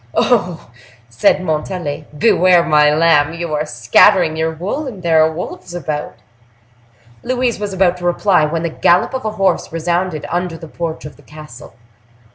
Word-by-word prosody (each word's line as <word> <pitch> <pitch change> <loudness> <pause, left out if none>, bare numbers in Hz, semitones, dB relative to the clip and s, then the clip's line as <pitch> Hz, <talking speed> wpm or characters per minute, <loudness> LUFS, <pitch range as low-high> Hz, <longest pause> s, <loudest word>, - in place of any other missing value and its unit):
"Oh! - - +3
oh!" 180 - -1 0.4
said 115 +10 +1
Montalais. 160 -1 -4
"Beware, 180 -1 +4
my 150 -2 +4
lamb! 155 -1 +2
You 170 -2 -5
are 150 0 -2
scattering 155 - +3
your 160 0 -1
wool, 195 - -4
and 200 -8 -9
there 165 -2 +3
are 160 - +1
wolves 175 +1 -8
about." 150 -3 -5 1.1
Louise 250 -3 -1
was 205 -1 -4
about 185 -2 +1
to 175 - -8
reply, 175 -1 +2
when 165 +2 -3
the 170 - -1
gallop 175 +7 +2
of 260 -3 -4
a 215 - -1
horse 195 -2 0
resounded 170 -1 -2
under 175 -1 -3
the 165 - -11
porch 165 0 -6
of 150 - -10
the - - -19
castle. 150 -5 -13
170 Hz, 170 wpm, -16 LUFS, 155-185 Hz, 1.1 s, Beware